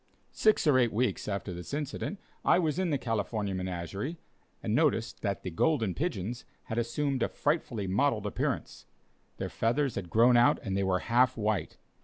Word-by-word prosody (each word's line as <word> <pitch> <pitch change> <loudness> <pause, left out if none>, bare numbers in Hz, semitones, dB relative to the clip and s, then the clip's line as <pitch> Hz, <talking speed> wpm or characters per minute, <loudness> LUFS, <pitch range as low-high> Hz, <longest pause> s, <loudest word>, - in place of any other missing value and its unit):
Six 215 -4 +3
or 140 -4 +5
eight 120 -3 +3
weeks 120 +4 0
after 100 -2 -3
this 90 +10 -5
incident, 150 +7 -4 0.2
I - - +5
was 165 -1 0
in 185 -2 +1
the 145 - +1
California 110 -4 -2
Menagerie, 95 - -4 0.5
and - - -1
noticed - - +1
that 100 -1 -2
the 90 - -4
"Golden 110 - +1
Pigeons" 120 - -3 0.2
had 115 - -2
assumed 135 +3 -1
a - - +3
frightfully 140 -9 -1
mottled 105 +3 +1
appearance. 105 - -3 0.5
Their - - -3
feathers 130 +3 0
had 90 -3 -5
grown 120 +4 +5
out 120 - +5
and 95 - -2
they 100 - +1
were 95 -1 +1
half 125 +4 +3
white. 105 -5 -1
115 Hz, 175 wpm, -30 LUFS, 100-140 Hz, 0.5 s, or